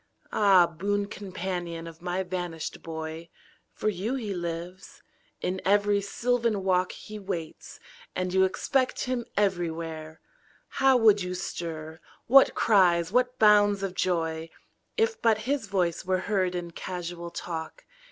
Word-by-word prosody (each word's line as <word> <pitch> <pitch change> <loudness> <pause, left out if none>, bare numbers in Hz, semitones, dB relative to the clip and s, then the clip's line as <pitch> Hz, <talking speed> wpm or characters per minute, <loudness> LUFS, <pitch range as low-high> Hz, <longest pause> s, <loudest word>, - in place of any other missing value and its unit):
Ah, 195 -4 +6
boon 200 +5 -1
companion 180 -4 -5
of 165 0 -11
my 180 +1 -1
vanished 175 -3 -5
boy. 160 +1 -6 0.4
For - - -4
you 210 +5 -1
he 220 -6 -3
lives; 175 +1 -6 0.4
in 185 +1 -2
every 205 +1 +3
sylvan 230 0 0
walk 185 -1 +2
He 215 0 -9
waits; 175 -5 -6 0.4
and 185 0 -2
you 190 0 +5
expect 255 +7 0
him 250 -2 -2
everywhere. 165 -5 -2 0.5
How 270 -1 +4
would 215 -3 +5
you 180 0 -3
stir, 160 -3 -5 0.3
what 270 +3 +6
cries, 180 -5 +4
what 250 +2 +2
bounds 205 -2 +5
of 195 -2 -2
joy. 165 -3 -1 0.5
If 455 0 +1
but 225 -2 +4
his 270 -4 -1
voice 180 -4 0
were 185 0 0
heard 190 -3 0
in 175 -1 -4
casual 175 -1 -6
talk. 170 - -6
185 Hz, 135 wpm, -27 LUFS, 170-205 Hz, 0.5 s, Ah